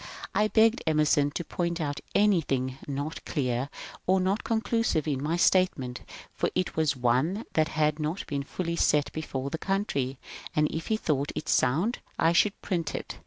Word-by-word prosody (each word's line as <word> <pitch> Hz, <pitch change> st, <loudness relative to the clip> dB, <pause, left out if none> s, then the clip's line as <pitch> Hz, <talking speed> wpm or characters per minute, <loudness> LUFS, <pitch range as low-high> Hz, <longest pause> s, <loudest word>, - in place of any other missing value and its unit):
I 210 Hz, -, +3 dB
begged 225 Hz, +2 st, +4 dB
Emerson 150 Hz, -2 st, +3 dB
to -, -, -1 dB
point 170 Hz, -1 st, -2 dB
out 145 Hz, -3 st, -2 dB, 0.2 s
anything 140 Hz, -10 st, +2 dB
not 145 Hz, +3 st, -4 dB
clear 130 Hz, -2 st, -1 dB, 0.4 s
or 190 Hz, +1 st, +4 dB
not 190 Hz, +3 st, 0 dB
conclusive 225 Hz, -7 st, 0 dB
in 140 Hz, -3 st, -1 dB
my 160 Hz, +4 st, 0 dB
statement, 160 Hz, -10 st, +2 dB, 0.3 s
for -, -, 0 dB
it 185 Hz, 0 st, -1 dB
was 155 Hz, -3 st, +2 dB
one 130 Hz, -, +1 dB
that 155 Hz, -1 st, +3 dB
had 150 Hz, 0 st, +1 dB
not 155 Hz, +5 st, -2 dB
been 140 Hz, -1 st, -2 dB
fully 170 Hz, +4 st, -3 dB
set 150 Hz, -3 st, +2 dB
before 140 Hz, -3 st, -4 dB
the 160 Hz, -, -3 dB
country, 140 Hz, -10 st, -1 dB, 0.4 s
and 150 Hz, 0 st, +3 dB
if 160 Hz, +1 st, -4 dB
he 220 Hz, -, +1 dB
thought 145 Hz, -7 st, -1 dB
it -, -, -4 dB
sound 165 Hz, -, +2 dB, 0.2 s
I 165 Hz, +1 st, +3 dB
should 200 Hz, +3 st, +3 dB
print 170 Hz, -4 st, -2 dB
it. -, -, -6 dB
155 Hz, 170 wpm, -28 LUFS, 140-185 Hz, 0.4 s, begged